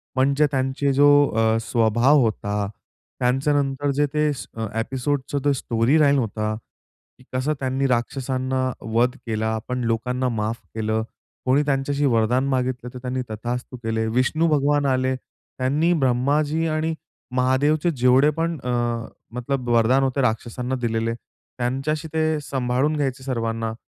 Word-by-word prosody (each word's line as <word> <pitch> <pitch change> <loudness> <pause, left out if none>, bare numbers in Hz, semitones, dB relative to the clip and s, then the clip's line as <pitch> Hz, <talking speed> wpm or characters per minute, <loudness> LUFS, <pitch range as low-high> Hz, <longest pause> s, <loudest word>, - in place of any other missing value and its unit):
म्हणजे 140 +3 +3
त्यांचे 135 +1 0
जो 145 +2 +5 0.2
अ, 110 0 +2
स्वभाव 120 +5 +3
होता, 105 -2 -1 0.5
त्यांच्यानंतर 135 +2 +1
जे 145 +2 +2
ते 150 0 +2
स - - -7 0.3
एपिसोडचं 135 +3 -2
ते 145 - +4
स्टोरी 120 +4 +1
लाईन 140 -1 +4
होता, 110 -2 -2 0.6
की 130 - -19
कसं 130 +4 0
त्यांनी 135 +1 0
राक्षसांना 130 +1 -1
वध 120 +4 +1
केला. 110 -1 -1
आपण 125 +3 -3
लोकांना 125 +3 0
माफ 110 +2 -2 0.2
केलं. 110 0 0 0.4
कोणी 135 +3 +3
त्यांच्याशी 140 +1 0
वरदान 125 +2 +2
मागितलं 125 -2 -1
तर - - -7
त्यांनी, 130 0 -3
"तथास्तु" 120 +3 -4
केले, 110 0 -1
विष्णु 130 +8 +1
भगवान 145 -1 +2
आले. 130 -1 +1
त्यांनी 140 +5 -2
ब्रह्माजी 145 +3 +1
आणि 155 +1 0 0.4
महादेवचे 145 +6 +2
जेवढे 130 +4 +5
पण 165 0 -1
अ, 125 - -3 0.6
मतलब 125 +1 -3
वरदान 120 +3 +4
होते 135 +1 0
राक्षसांना 125 +2 -1
दिलेले, 115 0 0
त्यांच्याशी 135 +7 -4
ते 155 -1 +1
सांभाळून 135 +2 0
घ्यायचे 135 -2 -2
सर्वांना. 115 -3 -2
130 Hz, 135 wpm, -23 LUFS, 120-140 Hz, 0.6 s, जो